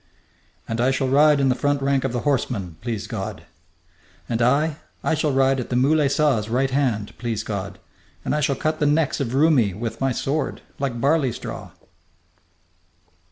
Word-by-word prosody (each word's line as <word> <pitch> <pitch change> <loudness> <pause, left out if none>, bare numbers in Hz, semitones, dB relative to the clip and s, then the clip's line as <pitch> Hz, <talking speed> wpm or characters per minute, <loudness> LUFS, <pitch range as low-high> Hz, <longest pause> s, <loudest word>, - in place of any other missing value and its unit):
"And 115 +1 -2
I 125 - +3
shall 135 0 0
ride 145 +2 +5
in 135 -1 +3
the - - +4
front 145 +2 0
rank 135 -1 +1
of 135 - -1
the 120 -1 -2
horsemen, 115 - -1
please 115 -4 -3
God!" - - -5 0.8
"And 115 0 -1
I, 145 +5 +2 0.3
I - - +1
shall 155 -1 +1
ride 135 0 +3
at 125 - -5
Moulay 140 +4 +3
Saa's 135 -7 +1
right 130 +3 +1
hand, 125 -7 0
please 115 -3 -2
God, 100 -2 -5 0.5
and - - 0
I 150 - 0
shall 140 -1 +1
cut 155 -1 -1
the 150 - +2
necks 150 0 +1
of 130 -2 -2
Roumi 135 - +3
with 115 +4 -5
my 135 0 +2
sword, 140 +5 -2 0.2
like 135 -4 -2
barley 140 0 +2
straw!" - - -7
135 Hz, 175 wpm, -23 LUFS, 120-145 Hz, 0.8 s, ride